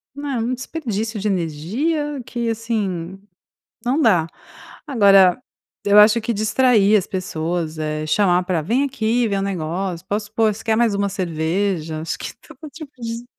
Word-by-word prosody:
Não, 285 0 -5
é 260 - -1
um 230 +3 -1
desperdício 230 -5 -4
de 210 - -2
energia 225 - -2
que, 235 -1 -3
assim, 195 -6 -3 0.7
não 265 +6 +1
dá. 185 - +4 0.6
Agora, 200 -6 +5 0.4
eu 205 0 +4
acho 215 +2 +7
que 235 - -2
distrair 215 -1 +3
as 190 - 0
pessoas, 165 -3 -3
eh, 155 0 -3
chamar 180 +1 +3
pra: 180 -3 0
"Vem 235 - +1
aqui 240 -3 0
ver 200 -1 -1
o 195 - -1
negócio", 180 -1 -3
"Posso 210 +1 -3
pôr?", 220 -1 +2
"Você 220 - -11
quer 220 -1 +1
mais 230 -3 +2
uma 200 0 0
cerveja?", 165 -2 -2
Acho 165 - -4
que - - -6
todo 310 - -13
tipo 300 0 -10
de 230 +1 -5
205 Hz, 165 wpm, -20 LUFS, 180-235 Hz, 0.7 s, acho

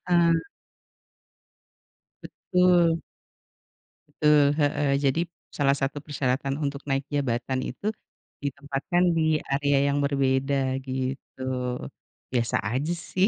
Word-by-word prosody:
heeh. 170 -2 +4 1.8
Betul. 175 -3 +2 1.1
Betul, 150 -1 +4
heeh, 145 -1 +2
jadi 140 +4 +2 0.3
salah 140 -1 +2
satu 135 +1 -2
persyaratan 135 -2 -1
untuk 140 0 -2
naik 135 0 0
jabatan 130 -2 -1
itu, 200 - -3 0.5
ditempatkan 140 +5 -1
di 160 -1 +3
area 140 0 +2 0.2
yang 145 - +1
berbeda 135 -1 +1
gitu. 130 0 -4 0.9
Biasa 120 -2 +1
aja 145 +8 0
sih, 185 +3 0
140 Hz, 95 wpm, -26 LUFS, 135-155 Hz, 1.8 s, heeh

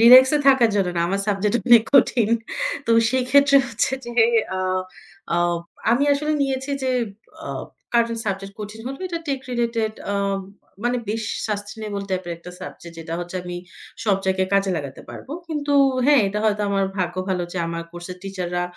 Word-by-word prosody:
Relax 255 +3 +9
এ - - +2
থাকার 250 -4 +5
জন্য 195 -3 +2
না। - - +2
আমার 195 +2 0
সাবজেক্ট 205 +1 +1
অনেক 235 -2 +8
কঠিন। 240 -5 +5 0.6
তো 230 - 0 0.2
সেক্ষেত্রে 275 +2 +4
হচ্ছে 230 +2 0
যে, - - -5 0.5
আ - - -2 0.8
আ - - +2 0.5
আমি 245 +5 +3
আসলে 300 +2 0
নিয়েছি 270 0 -2
যে, 260 - +1 0.6
আ - - -5 0.5
কারেন্ট 230 -1 +2
সাবজেক্ট 195 0 -3
কঠিন 210 +1 -7
হলো, 270 +1 -5
এটা 340 -2 -3
টেক 275 -2 -1
রিলেটেড 230 -2 0 0.2
আ - - -1 0.7
মানে 245 +1 +2
বেশ 220 +1 -2 0.3
সাসটেইনেবল 205 0 -4
টাইপের 185 -2 -2
একটা 170 +1 -11
সাবজেক্ট, 170 -1 -9
যেটা 165 0 -5
হচ্ছে 175 +1 -5
আমি 175 0 -6 0.5
সব 205 -3 +3
জায়গায় 190 0 +1
কাজে 195 -1 +2
লাগাতে 140 -3 -6
পারবো। 270 - -9 0.2
কিন্তু 295 -2 -2 0.3
হ্যাঁ, 290 -4 +6
এটা 210 +2 -2
হয়তো 210 -1 +2
আমার 195 -1 +2
ভাগ্য 180 -1 -1
ভালো 185 -2 0
যে, 185 - -3
আমার 170 0 -3
কোর্সের 175 +1 -7
টিচাররা 180 -2 -3
210 Hz, 170 wpm, -22 LUFS, 190-255 Hz, 0.8 s, Relax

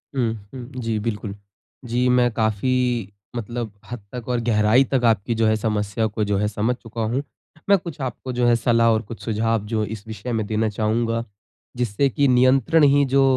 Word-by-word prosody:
हुँ, 120 -4 +1 0.2
हुँ। 130 0 -7
जी, 115 -1 -1
बिल्कुल। 105 -2 -4 0.5
जी, 120 +2 +1
मैं 125 -1 +3
काफ़ी 115 0 0 0.2
मतलब 120 -1 -4 0.2
हद 120 - -4
तक 125 -2 -6
और 125 -1 +1
गहराई 110 +4 +4
तक 130 -2 +2
आपकी 115 0 +2
जो 110 0 +2
है 110 - +3
समस्या 105 0 -1
को 105 0 -2
जो 100 -1 0
है 105 +1 +1
समझ 110 +4 0
चुका 115 -1 -7
हूँ। 135 +3 0 0.5
मैं 200 - +7
कुछ 170 -5 -8
आपको 130 0 -4
जो 120 0 +1
है 120 - +5
सलाह 115 0 +3
और 110 -1 +2
कुछ 115 -1 -10
सुझाव 115 -1 0
जो 110 0 -1
इस 105 - -12
विषय 110 +3 -6
में 110 -2 0
देना 110 0 0
चाहूँगा 115 +2 0 0.5
जिससे 125 +3 +1
कि 140 +3 +2
नियंत्रण 130 +4 +4
ही 145 0 +5
जो 140 0 +5
115 Hz, 195 wpm, -22 LUFS, 110-125 Hz, 0.5 s, मैं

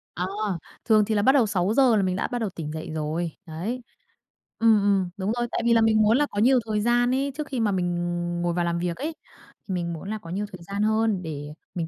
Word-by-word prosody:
Ờ, 180 - -1 0.6
thường 215 -2 +5
thì 220 +1 -1
là 205 - +3
bắt 265 - +5
đầu 260 -6 +4
6:00 215 +6 +3
là 210 - +3
mình 185 -1 0
đã - - -1
bắt 245 - -3
đầu 220 -3 -1
tỉnh 160 -4 -6
dậy 160 0 -6
rồi. 160 +2 -2 0.2
Đấy. 195 +11 -4 0.8
Ừm, 225 -2 +5
ừm, 195 -3 +2
đúng 195 +2 -1
rồi, 240 0 0
tại - - -1
vì 235 - +5
là 230 - +5
mình 220 -1 +4
muốn 215 +3 +4
là 295 - +3
có 205 - -2
nhiều 255 +4 +5
thời 210 -1 +1
gian 240 +2 +3
ấy 275 +1 0
trước 300 -1 -4
khi 265 -3 -3
mà 215 -3 +2
mình 175 -2 0 0.5
ngồi 175 0 0
vào 175 0 0
làm 170 0 -1
việc 175 -1 -2
ấy, 315 +3 -4 0.5
thì 190 - -3
mình 170 -1 -2
muốn 165 +4 -7
là 220 - -2
có 170 - -12
nhiều 195 +4 -2
thời 180 -3 -10
gian 200 +3 -2
hơn 220 -2 +2
để 145 -3 -6 0.3
mình 170 -2 -2
205 Hz, 260 wpm, -25 LUFS, 175-230 Hz, 0.8 s, thường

